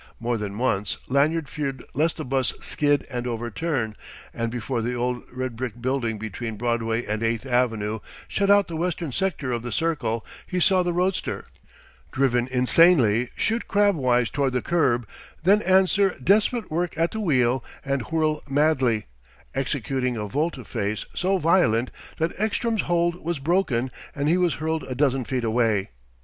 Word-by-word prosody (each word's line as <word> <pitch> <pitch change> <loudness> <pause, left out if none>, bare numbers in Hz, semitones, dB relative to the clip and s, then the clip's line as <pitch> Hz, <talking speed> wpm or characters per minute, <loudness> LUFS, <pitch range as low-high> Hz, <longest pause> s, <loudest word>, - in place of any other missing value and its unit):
More 120 +1 -1
than 105 -2 -4
once 105 -4 0
Lanyard 150 +4 +2
feared 135 -2 -4
lest 155 +5 +1
the - - -5
'bus 130 0 +1
skid 145 -2 +1
and 125 -2 -4
overturn; 120 +1 -2 0.4
and 115 0 -2
before 120 0 -2
the 120 +2 -2
old 125 0 -1
red 130 -1 -4
brick 120 -1 -5
building 120 -3 -1
between 110 +1 -5
Broadway 115 0 -1
and 110 +1 -2
Eighth 115 +2 0
Avenue 115 -4 0 0.3
shut 200 -1 0
out 200 -1 +5
the 165 - -6
western 165 -2 -2
sector 155 -4 -1
of 120 -1 -1
the 120 +1 -5
Circle, 130 -6 -1 0.2
he 180 - -1
saw 185 +1 +4
the 175 0 0
roadster, 180 +2 -1 0.7
driven 125 -3 +1
insanely, 125 -3 +4
shoot 225 +1 0
crabwise 135 - +2
toward 140 -3 0
the 125 - 0
curb, 130 -9 +1 0.4
than 200 +4 +5
answer 190 +1 +3
desperate 215 - +2
work 170 0 -1
at 165 +1 +1
the 220 - -4
wheel 130 - +2 0.2
and 135 -1 0
whirl 155 -1 +1
madly, 135 -6 +2 0.5
executing 130 -2 -1
a 105 -1 -3
volte 140 +1 -2
face 105 -2 -3
so 190 +2 +1
violent 150 -9 +3 0.3
that 165 +2 0
Ekstrom's 220 +1 0
hold 175 0 0
was 170 0 -1
broken 135 -5 0 0.2
and 145 0 -1
he 170 +4 +4
was 180 -3 +2
hurled 160 +1 -2
a 130 - -6
dozen 135 -1 +2
feet 125 0 -2
away. 110 -3 +1
135 Hz, 160 wpm, -24 LUFS, 120-165 Hz, 0.7 s, out